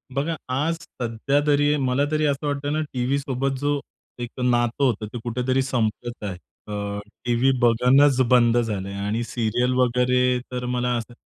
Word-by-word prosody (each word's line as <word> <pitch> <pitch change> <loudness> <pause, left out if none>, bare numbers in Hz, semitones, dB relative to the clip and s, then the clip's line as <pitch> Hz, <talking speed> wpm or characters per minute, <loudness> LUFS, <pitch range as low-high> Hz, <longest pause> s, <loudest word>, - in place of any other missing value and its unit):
बघा 155 +4 0
आज 150 +6 0 0.3
सध्यातरी 145 +5 +2
मलातरी 145 +4 +1
असं 145 +1 0
वाटतं 145 +1 -2
ना 155 - 0
टीव्हीसोबत 135 +1 -1
जो 145 0 0 0.4
एक 120 -1 -4
नातं 120 +2 +1
होतं 110 -5 +1
ते 120 - -4
कुठेतरी 125 +2 0
संपत 120 -3 -2
आहे. 95 -3 -4 0.3
अ, 100 0 -4 0.3
टीव्ही 120 +2 +3
बघणंच 125 +4 +4
बंद 120 -1 +5
झालं 105 -5 -1
आहे 100 - -6
आणि 110 +3 -1
सीरियल 120 +2 0
वगैरे 125 0 +2
तर 125 0 -3
मला 125 0 0
असं 115 +1 -6
125 Hz, 150 wpm, -23 LUFS, 120-140 Hz, 0.4 s, बंद